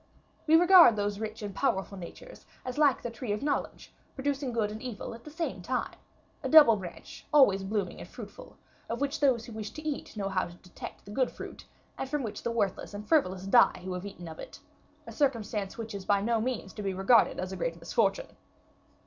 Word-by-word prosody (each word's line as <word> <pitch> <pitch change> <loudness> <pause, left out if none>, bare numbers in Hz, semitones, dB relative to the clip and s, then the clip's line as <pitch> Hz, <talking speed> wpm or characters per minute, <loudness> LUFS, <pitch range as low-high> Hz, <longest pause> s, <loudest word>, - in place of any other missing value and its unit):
We 315 - +6
regard 350 - +8
those 205 -1 -2
rich 220 0 -5
and 205 -1 -5
powerful 195 -5 -1
natures 190 - -11 0.2
as 255 +3 -4
like 285 -4 +4
the 240 - -3
tree 235 -1 -5
of 210 - -4
knowledge, 290 - -3 0.2
producing 275 -1 -2
good 220 -3 0
and 215 +1 -7
evil 240 -3 -6
at 230 0 -12
the - - -8
same 325 +2 -4
time; - - -2 0.5
a - - -3
double 295 -8 +9
branch, 180 -4 -9
always 230 -10 +5
blooming 195 -2 -2
and - - -9
fruitful, - - -11 0.3
of 235 - -3
which 285 +1 -1
those 255 -5 +2
who 235 - -10
wish 215 -1 -5
to 310 0 -7
eat 285 -6 -4
know 200 -1 -1
how 190 -1 0
to 175 - -12
detect 180 0 -11
the 205 - -10
good 255 +3 +1
fruit, - - -10 0.3
and 265 - -3
from 295 -1 -1
which 220 - -5
the - - -2
worthless 205 -3 -2
and 210 +1 -7
frivolous 190 - +2
die 195 -1 +4
who 185 - -3
have 180 +2 -5
eaten 180 -3 -9
of 160 -1 -9
it - - -9 0.5
a - - -8
circumstance 220 -8 -1
which 225 -1 -6
is 200 -1 -5
by 200 +1 +2
no 225 +2 +1
means 230 -5 -3
to - - -7
be 195 -2 -2
regarded 215 +5 +4
as 185 +1 -3
a - - -4
great 165 -2 -3
misfortune. 195 +4 0
220 Hz, 215 wpm, -29 LUFS, 195-265 Hz, 0.5 s, double